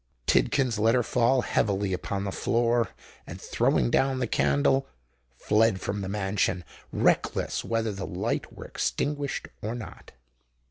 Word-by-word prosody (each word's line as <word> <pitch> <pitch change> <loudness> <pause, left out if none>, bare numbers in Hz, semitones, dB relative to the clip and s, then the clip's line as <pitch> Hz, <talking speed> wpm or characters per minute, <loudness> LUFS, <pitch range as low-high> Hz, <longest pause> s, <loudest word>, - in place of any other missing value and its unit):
Tidkins 125 -6 +2
let 115 +3 +4
her 125 - +3
fall 125 +3 +2
heavily 100 -2 0
upon 95 +2 -3
the 100 - -3
floor, 115 +2 +1 0.4
and - - -8
throwing - - +1
down 135 -1 +2
the 130 - 0
candle, 75 - +2 0.5
fled 105 - +2
from 100 +1 -3
the 95 - -4
mansion, 95 -2 0 0.3
reckless - - +1
whether 115 -1 -1
the 95 -2 -5
light - - -2
were - - -10
extinguished 145 -1 -2
or 110 +3 -3
not. 115 -4 -10
110 Hz, 140 wpm, -27 LUFS, 95-120 Hz, 0.5 s, let